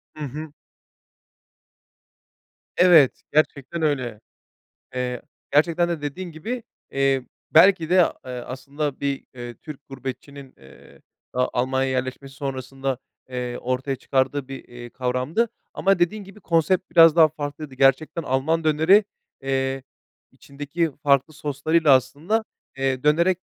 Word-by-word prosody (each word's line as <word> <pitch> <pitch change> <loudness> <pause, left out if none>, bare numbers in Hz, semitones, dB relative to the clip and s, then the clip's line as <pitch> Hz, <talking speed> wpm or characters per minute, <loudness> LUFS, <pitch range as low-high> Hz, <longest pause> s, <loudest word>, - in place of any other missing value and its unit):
Hı 155 - -6
hı. 150 +3 -7 2.3
Evet, 170 -7 +6
gerçekten 155 +1 0
öyle. 130 -8 -1 0.8
Eee, 125 -1 -3 0.3
gerçekten 170 +3 +3
de 165 -4 -3
dediğin 170 +4 -5
gibi, 230 +10 -5 0.3
eee, 135 -2 +1 0.2
belki 165 0 +5
de, 185 - +5 0.3
ııı, 125 -1 -6
aslında 140 +2 -4
bir, 140 -1 -2
ııı, 120 -1 -7
Türk 145 -2 -11
gurbetçinin, 135 +1 -8
eee, 65 0 -17 0.3
daha 125 0 +1
Almanya'ya 130 +2 0
yerleşmesi 130 +1 -4
sonrasında, 135 -1 -4 0.3
eee, 125 -1 -4
ortaya 130 +2 -2
çıkardığı 135 +1 -1
bir, 135 - -8
eee, 120 -1 -10
kavramdı, 130 - -1 0.3
ama 195 -1 +2
dediğin 195 +4 0
gibi, 195 +2 -14
konsept 170 +3 +1
biraz 165 -1 +7
daha 160 -1 +7
farklıydı. 145 -2 -6
Gerçekten 135 +5 +2
Alman 155 +4 0
döneri, 160 +7 +5 0.4
eee, 135 0 -1 0.5
içindeki 145 +4 -3
farklı 140 +1 +2
soslarıyla 150 +1 +1
aslında, 150 - 0 0.3
eee, 135 -1 -1
dönerek, 170 +5 +3
140 Hz, 120 wpm, -23 LUFS, 130-160 Hz, 2.3 s, biraz